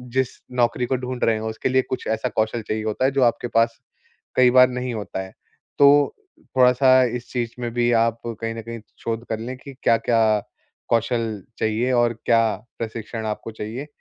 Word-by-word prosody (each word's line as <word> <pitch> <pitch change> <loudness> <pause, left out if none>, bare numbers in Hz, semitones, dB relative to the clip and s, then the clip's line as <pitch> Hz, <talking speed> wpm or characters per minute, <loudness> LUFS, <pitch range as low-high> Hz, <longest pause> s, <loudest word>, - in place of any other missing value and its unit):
जिस 130 -1 +3 0.3
नौकरी 125 0 +1
को 130 - 0
ढूँढ 125 0 -5
रहे 115 -1 +3
हो, 110 +1 -3
उसके 110 - -2
लिए 130 0 +3
कुछ 130 - -3
ऐसा 110 0 -1
कौशल 110 +1 -1
चाहिए 110 +1 -3
होता 110 +4 -1
है, 135 - +3
जो 135 -1 +2
आपके 120 0 +1
पास 115 0 +2 0.6
कई 125 -1 +6
बार 125 0 +7
नहीं 125 -1 -3
होता 105 -3 -4
है। 95 0 -10 0.5
तो 145 0 +6 0.4
थोड़ा-सा 130 +1 +6
इस 120 - -9
चीज़ 120 -2 -2
में 120 -1 -2
भी 120 0 +2
आप 115 0 +2
कहीं 115 0 -4
न 115 - -6
कहीं 115 +1 -7 0.2
शोध 115 0 -2
कर 110 - -2
लें 120 +3 -6
कि 135 +1 -11
क्या-क्या 115 0 +3 0.7
कौशल 115 -3 0 0.2
चाहिए 115 +3 0
और 120 -1 +3
क्या 115 -1 +5 0.4
प्रशिक्षण 110 0 -5
आपको 110 +1 -4
चाहिए। 110 +6 -6
115 Hz, 190 wpm, -22 LUFS, 110-125 Hz, 0.7 s, बार